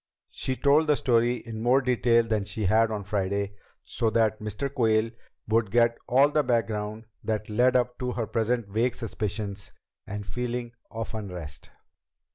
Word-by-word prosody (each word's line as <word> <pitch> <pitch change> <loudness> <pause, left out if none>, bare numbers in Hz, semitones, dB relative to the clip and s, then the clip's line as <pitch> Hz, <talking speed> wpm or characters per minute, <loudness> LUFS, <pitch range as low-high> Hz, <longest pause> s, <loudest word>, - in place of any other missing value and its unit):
She 130 - -2
told 145 +4 +3
the 150 - +4
story 120 -2 +2
in 115 -2 -7
more 125 +3 +4
detail 120 -2 +3
than 110 -3 0
she 105 +1 -4
had 110 +4 +4
on 105 -2 -3
Friday, 100 0 -1 0.3
so 115 - -1
that 110 -1 +2
Mr. 105 +6 -3
Quayle 115 -3 +2 0.4
would 110 -1 +2
get 115 +2 +3
all 135 +4 +5
the 150 +1 +2
background 110 -3 -1 0.2
that 110 0 -2
led 125 +4 +3
up 125 -1 +1
to 125 -1 -2
her 115 - -2
present 115 +1 0
vague 115 +4 0
suspicions 105 - -4 0.4
and 100 0 -5
feeling 120 +4 -3 0.2
of 115 0 -5
unrest. 90 -8 -7
115 Hz, 160 wpm, -27 LUFS, 105-125 Hz, 0.4 s, all